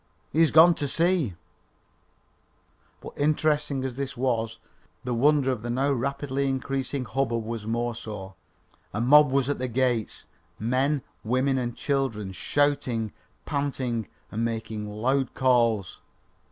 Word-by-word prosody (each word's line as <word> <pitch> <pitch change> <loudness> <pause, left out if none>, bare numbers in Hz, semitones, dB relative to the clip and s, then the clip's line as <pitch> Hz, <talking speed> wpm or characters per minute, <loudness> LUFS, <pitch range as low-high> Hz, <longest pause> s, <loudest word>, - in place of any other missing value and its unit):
He 155 - 0
has 165 -2 +6
gone 165 +3 +7
to 145 -3 -3
see 165 - +1 0.8
" - - -39
But - - -9
interesting 150 -2 +1
as 130 -1 -4
this 140 -2 -4
was, 115 -3 -1 0.5
the 125 -1 -2
wonder 140 +2 +3
of 125 -4 -3
the 120 - -5
now 135 +4 +1
rapidly 140 +1 -1
increasing 135 0 -2
hubbub 115 -1 -1
was 115 -2 -5
more 120 +1 -1
so. 105 -4 -7 0.6
A - - -1
mob 145 +5 +6
was 135 -1 +1
at 145 - -1
the 130 - -1
gates! 120 -2 -1 0.3
Men, 130 +5 0 0.2
women 130 +3 +1
and 120 -2 -3
children 130 -9 -1
shouting, 125 -1 0 0.3
panting 130 -6 -2 0.2
and 110 +2 -2
making 110 -2 -3
loud 125 +5 0
calls. 120 -7 +2
130 Hz, 140 wpm, -26 LUFS, 115-140 Hz, 0.8 s, gone